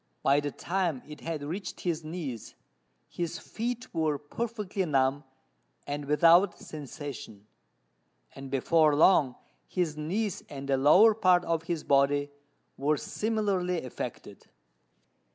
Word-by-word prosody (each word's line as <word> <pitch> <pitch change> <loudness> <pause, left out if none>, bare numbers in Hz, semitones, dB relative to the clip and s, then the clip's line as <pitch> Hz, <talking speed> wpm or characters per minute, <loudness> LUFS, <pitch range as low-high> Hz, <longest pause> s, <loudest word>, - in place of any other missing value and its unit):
By 140 +1 +4
the 145 0 -2
time 170 -3 -2
it 150 -1 -10
had 160 -3 -4
reached 180 +7 -5
his 170 -3 -2
knees, 155 -8 -6 0.5
his 170 -2 -4
feet 240 +2 -5
were 160 -3 0
perfectly 205 +5 -4
numb 140 -3 +1 0.6
and 145 0 -4
without 170 +6 +5
sensation; 140 -8 -8 0.9
and 135 0 -9
before 150 +3 +3
long 145 -5 +4 0.3
his 175 -5 -1
knees 185 +6 -2
and 140 -1 -7
the 135 - +2
lower 180 +12 +6
part 185 -4 +3
of 165 -1 0
his 170 -3 -3
body 145 +1 +2 0.5
were 150 +2 +1
similarly 200 -5 -1
affected. 125 - -8
155 Hz, 120 wpm, -29 LUFS, 145-180 Hz, 0.9 s, lower